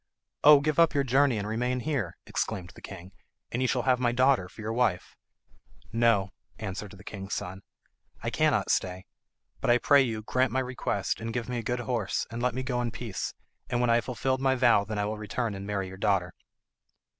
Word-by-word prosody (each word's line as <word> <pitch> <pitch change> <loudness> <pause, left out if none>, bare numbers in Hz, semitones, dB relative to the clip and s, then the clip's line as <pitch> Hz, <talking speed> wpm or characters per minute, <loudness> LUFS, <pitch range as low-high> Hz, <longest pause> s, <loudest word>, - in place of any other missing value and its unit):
"Oh, 150 -1 +9
give 155 +2 0
up 165 -2 +5
your 140 - +3
journey 135 -1 +3
and 100 0 -3
remain 125 +3 -1
here," 125 - -2
exclaimed 90 -2 -3
the - - -14
king, 95 -1 -9 0.4
"and 120 - -1
you 130 - +2
shall 125 -1 0
have 130 -1 +3
my 120 -1 +2
daughter 125 -6 +3
for - - -18
your 110 +1 -3
wife." 115 -7 0 0.8
"No," 115 -5 +3 0.3
answered 100 -1 -5
the 95 0 -13
king's 95 -1 -5
son, 95 +2 -5 0.6
"I - - -1
cannot - - +2
stay; 90 0 -1 0.5
but, - - -1
I 120 - +6
pray 140 +3 +5
you, 110 -4 -2
grant 130 +2 +1
my 130 - +1
request, 130 -1 -2
and 115 +1 -3
give 120 0 -3
me 125 -1 -2
a - - -2
good 120 +2 -2
horse, 120 -6 -1
and 115 +1 -4
let 125 -1 0
me 130 - -2
go 125 -1 -1
in 120 - -1
peace, 115 -3 -5 0.3
and 120 - 0
when 120 -1 +3
I - - +5
have - - -17
fulfilled 130 +1 -1
my 135 -1 +3
vow 125 -5 +4
then 105 0 -5
I 105 - 0
will 105 +1 -3
return 110 +2 -2
and 100 0 -7
marry 100 -2 -2
your 95 0 -9
daughter." 95 -4 +1
115 Hz, 215 wpm, -28 LUFS, 100-125 Hz, 0.8 s, Oh